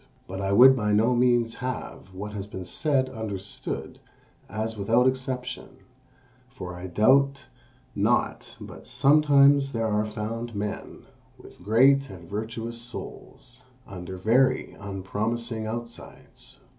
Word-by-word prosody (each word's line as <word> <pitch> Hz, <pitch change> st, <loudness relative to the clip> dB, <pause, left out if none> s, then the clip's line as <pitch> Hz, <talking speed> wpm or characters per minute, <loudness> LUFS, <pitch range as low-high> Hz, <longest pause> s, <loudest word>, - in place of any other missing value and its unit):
But 95 Hz, +1 st, -6 dB
I 95 Hz, 0 st, -1 dB
would 130 Hz, +6 st, +8 dB
by 105 Hz, -4 st, 0 dB
no 115 Hz, +4 st, +3 dB
means 120 Hz, -2 st, +2 dB
have 125 Hz, -6 st, -5 dB
what 105 Hz, +2 st, -6 dB
has 100 Hz, -1 st, -5 dB
been 95 Hz, -3 st, -7 dB
said 135 Hz, -, +1 dB
understood 105 Hz, -5 st, -4 dB, 0.5 s
as 110 Hz, +2 st, -3 dB
without 115 Hz, +4 st, +2 dB
exception; 130 Hz, -1 st, -3 dB, 0.7 s
for 90 Hz, -8 st, -8 dB
I 90 Hz, +1 st, -7 dB
doubt 135 Hz, +9 st, +3 dB, 0.5 s
not -, -, 0 dB
but -, -, -11 dB
sometimes 140 Hz, -1 st, +4 dB
there 115 Hz, -1 st, -1 dB
are 105 Hz, 0 st, 0 dB
found 115 Hz, +2 st, -5 dB
men 105 Hz, 0 st, -5 dB, 0.3 s
with -, -, -16 dB
great 135 Hz, +7 st, +4 dB
and 90 Hz, -4 st, -11 dB
virtuous 115 Hz, +3 st, -4 dB
souls 125 Hz, +1 st, -9 dB, 0.2 s
under 95 Hz, -2 st, -8 dB
very 130 Hz, +7 st, +2 dB
unpromising 110 Hz, +4 st, -3 dB
outsides." 120 Hz, +1 st, -9 dB
115 Hz, 120 wpm, -26 LUFS, 105-130 Hz, 0.7 s, would